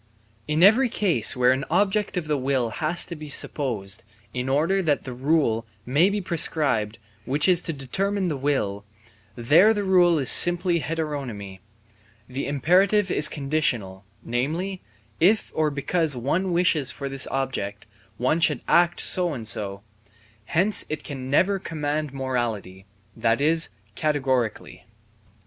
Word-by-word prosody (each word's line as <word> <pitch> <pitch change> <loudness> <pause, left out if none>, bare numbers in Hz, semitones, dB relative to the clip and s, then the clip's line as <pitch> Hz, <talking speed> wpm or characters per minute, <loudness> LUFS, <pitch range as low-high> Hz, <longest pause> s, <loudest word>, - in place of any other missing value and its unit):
In 155 +3 +1
every 235 +6 +5
case 170 - +1
where 125 0 +4
an 130 +1 -1
object 200 +3 0
of 175 - -2
the 150 -1 -1
will 130 -3 -1
has 160 +8 0
to 170 - -8
be 155 -1 -10
supposed, 115 -8 -2 0.3
in 125 +1 -3
order 165 +8 +1
that 150 -5 0
the 130 - -7
rule 125 -4 0 0.2
may 145 +9 +3
be 205 +1 -2
prescribed 145 - 0 0.3
which 145 - +1
is 180 -2 +4
to 165 - -3
determine 190 +8 -2
the 155 - -2
will, 130 -8 -2 0.5
there 165 - +4
the 205 - -2
rule 180 -3 +3
is 135 -4 -1
simply 175 0 +5
heteronomy; 140 -12 -5 0.7
the 130 +2 -5
imperative 185 +8 +2
is 150 - +4
conditional, 135 -10 -2 0.2
namely, 160 +11 -3 0.4
if 200 +6 +2
or 155 -1 +1
because 145 +2 -2
one 165 +10 -1
wishes 170 -5 +1
for 140 +1 -5
this 135 -1 0
object, 130 -7 -4 0.3
one 130 +7 0
should 150 -6 +2
act 175 0 +2
so 175 -4 +4
and 115 -3 -6
so: 100 -1 -2 0.6
hence 185 - +2
it 155 - -5
can 130 -3 -7
never 190 +8 +2
command 150 -3 -3
morally, 115 -8 -4 0.3
that 115 +1 0
is, 160 +3 +3 0.2
categorically. 130 -4 -2
145 Hz, 145 wpm, -23 LUFS, 125-175 Hz, 0.7 s, every